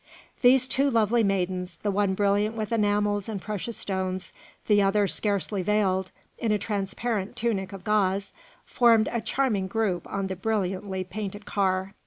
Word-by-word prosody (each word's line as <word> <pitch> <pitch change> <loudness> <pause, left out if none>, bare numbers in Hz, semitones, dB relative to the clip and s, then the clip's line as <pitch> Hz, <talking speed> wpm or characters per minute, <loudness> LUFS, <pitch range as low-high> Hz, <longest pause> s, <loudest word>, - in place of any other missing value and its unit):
These 255 0 +5
two 275 +2 +2
lovely 230 -1 +3
maidens, 185 -2 -1
the 205 - +1
one 200 -1 +1
brilliant 205 +2 +1
with 215 -1 -3
enamels 205 -2 +1
and 210 -3 -3
precious 215 +3 -4
stones, 190 -1 -3 0.3
the 205 -1 +4
other 200 +1 +3
scarcely 200 0 0
veiled 190 -1 +1 0.3
in 225 - 0
a 210 - +3
transparent 205 +1 -3
tunic 200 -5 -1
of 195 -2 -9
gauze, 200 -1 +1 0.3
formed 230 -3 +4
a 235 - -1
charming 220 -4 0
group 205 -4 -1
on 195 -1 -1
the 190 0 -3
brilliantly 190 -1 -2
painted 205 +1 -6
car. 190 -1 0
205 Hz, 155 wpm, -26 LUFS, 190-215 Hz, 0.3 s, These